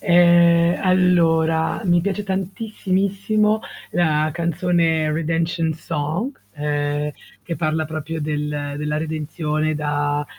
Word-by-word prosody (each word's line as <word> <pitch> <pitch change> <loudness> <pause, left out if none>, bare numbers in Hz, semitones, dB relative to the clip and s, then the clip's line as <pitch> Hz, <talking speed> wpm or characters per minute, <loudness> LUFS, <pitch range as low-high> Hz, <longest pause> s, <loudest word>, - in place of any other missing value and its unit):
Ehm, 170 -1 +5
allora, 165 -3 +2
mi 175 -1 +3
piace 200 +2 -2
tantissimissimo 200 +2 0 0.3
la 155 -3 +2
canzone 170 -2 +1
Redemption 165 +1 0
Song, 165 - -3 0.2
ehm, 145 0 -1 0.3
che 170 - -4
parla 155 -1 -1
proprio 155 +1 -5
del 150 -1 -3
della 150 0 -2
redenzione 155 0 -2
da 145 0 -1
165 Hz, 100 wpm, -21 LUFS, 150-180 Hz, 0.3 s, Ehm